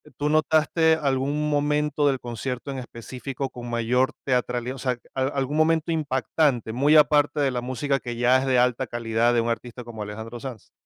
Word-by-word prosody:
¿tú 150 +1 -1
notaste 160 +1 +3
algún 140 +2 0
momento 150 0 +1
del 135 -2 0
concierto 125 +3 -5
en 135 - -5
específico 130 +2 -6
con 120 -1 -8
mayor 120 +2 +1
teatralía 125 -1 -1
o - - -10
sea, 125 -2 -1 0.2
a 130 - 0
algún 140 +1 -2
momento 160 +1 +2
impactante, 140 -4 0
muy 145 +6 +3
aparte 145 -1 +4
de 135 -2 +2
la 125 - -2
música 130 +3 -1
que 120 -1 -6
ya 125 +2 +4
es 135 - -2
de 130 -1 +2
alta 125 0 +2
calidad 115 0 +1
de 120 - +3
un 115 - -2
artista 120 +1 -4
como 115 -2 -9
Alejandro 110 +3 -7
Sanz? 120 -5 -9
130 Hz, 190 wpm, -24 LUFS, 120-145 Hz, 0.2 s, aparte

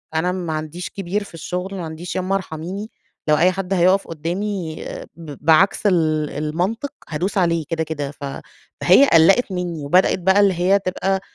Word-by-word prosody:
أنا 170 +3 +1
ما 180 -3 -3
عنديش 155 +3 -5
كبير 195 +2 -3
في 200 - -14
الشغل، 180 +4 -5
ما 180 -3 -4
عنديش 160 +2 -7
يامّا 185 +1 0
أرحميني، 190 +4 -5 0.4
لو 150 - +5
أي 175 +4 +4
حد 190 0 -3
هيُقف 185 +2 +3
قدّامي 170 +1 -4 0.3
ب 160 -3 -9
بعكس 170 +7 +4
ال 155 -5 +1
المنطق، 180 - -2 0.2
هادوس 175 +6 -2
عليه 170 -3 +1
كده، 165 -1 -1
كده، 145 -3 -4
ف 145 -1 -9 0.6
فهي 280 - +6
قلّقِت 195 +8 +5
مني 175 -5 -3
وبدأت 180 +6 +3
بقى 190 +3 +3
اللي 200 -2 +4
هي 180 +3 +3
تبقى 190 0 -1
180 Hz, 170 wpm, -21 LUFS, 160-195 Hz, 0.6 s, فهي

